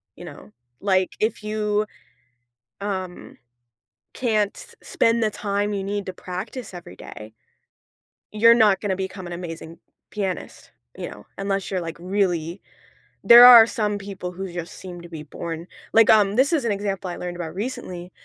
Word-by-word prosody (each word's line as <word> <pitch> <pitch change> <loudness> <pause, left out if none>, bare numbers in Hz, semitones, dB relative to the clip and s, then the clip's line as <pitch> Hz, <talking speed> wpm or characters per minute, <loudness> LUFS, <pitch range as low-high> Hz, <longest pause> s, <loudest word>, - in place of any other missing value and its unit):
you - - -11
know? - - -12 0.3
Like, 190 -2 +2
if 215 0 -1
you, 210 0 -1 1.0
um, 185 -3 -5 0.8
can't 215 -5 0 0.3
spend 230 0 +1
the 215 - +2
time 205 0 -2
you 195 -1 -2
need 205 0 -3
to 185 - -4
practice 185 +6 -7
every 170 - -10
day 105 +3 -11 1.0
you're 230 +2 +6
not 215 -5 +4
gonna 195 -3 -1
become 190 -1 -6
an 175 - -6
amazing 165 -1 -8 0.3
pianist, 195 -3 -5 0.3
you - - -5
know, - - -12
unless 195 -1 -2
you're, 185 -2 -2
like, 165 -1 -6
really 180 -2 -1 0.6
there 240 +1 +10
are 240 -2 +11
some 210 -3 -1
people 195 -3 -7
who 190 +1 -6
just 170 -1 -6
seem 175 -2 -9
to 170 - -11
be 155 -2 -8
born 165 +3 -6 0.3
like, 225 -1 +6
um, 205 -1 +5
this 280 +6 +3
is 290 -6 0
an 230 - +1
example 195 -2 -3
I - - -5
learned 175 -1 -6
about 165 -2 -6
recently, 190 -5 -5
195 Hz, 160 wpm, -23 LUFS, 180-210 Hz, 1.0 s, are